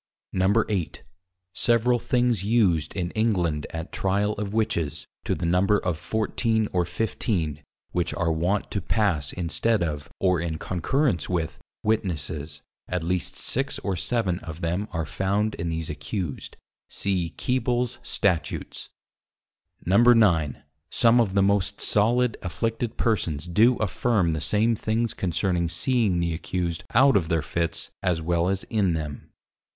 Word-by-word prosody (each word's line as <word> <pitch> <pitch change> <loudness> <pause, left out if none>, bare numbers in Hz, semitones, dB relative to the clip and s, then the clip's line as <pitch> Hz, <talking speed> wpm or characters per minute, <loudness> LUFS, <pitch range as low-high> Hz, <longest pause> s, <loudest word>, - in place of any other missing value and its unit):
8. 95 -6 -3 0.5
Several 120 +1 +3
things 120 -5 +1
used 100 -8 +2
in 90 -2 -2
England 90 -9 0
at 80 +1 -6
Tryal 100 +2 0
of 100 -2 -3
Witches, 95 -9 -1 0.2
to - - 0
the 85 - -3
Number 90 +4 +3
of 90 -4 -1
14 110 +4 0
or 90 -1 +2
15 90 - -2 0.3
which 85 -1 -1
are 85 -3 +1
wont 90 +6 0
to 100 - -1
pass 90 -8 0
instead 95 +5 +1
of, 75 -3 -4
or 90 -3 +2
in 80 -1 -2
Concurrence 95 - 0
with 85 -3 -2 0.2
Witnesses, 80 -8 -2 0.2
at 90 -2 -2
least 90 +1 -1
6 135 +2 -1
or 100 -2 -1
7 95 -1 -1
of 80 -1 -8
them 90 +5 -1
are 80 -1 -2
found 100 +6 0
in 85 0 -3
these 80 -1 -3
accused: 75 +1 -5 0.3
see 90 -4 -1
Keebles 125 -1 0
Statutes. 90 -5 -1 1.0
9. 95 - +4 0.3
Some 120 0 +4
of 100 -4 -1
the 100 - +4
most 100 0 +1
solid 120 +3 +2
Afflicted 115 +5 -2
Persons 85 -10 0
do 110 +8 +4
affirme 105 -4 +1
the 80 - -2
same 105 +10 +2
things 110 +1 -1
concerning 90 -1 0
seeing 100 +1 +1
the 85 -1 0
accused 85 0 -3
out 135 +2 +6
of 85 -5 +2
their 80 -2 +1
Fitts 85 +2 -2
as 90 -3 +1
well 85 +2 +1
as 95 0 -1
in 100 -6 +2
them. 75 -3 -5
95 Hz, 140 wpm, -25 LUFS, 85-110 Hz, 1.0 s, out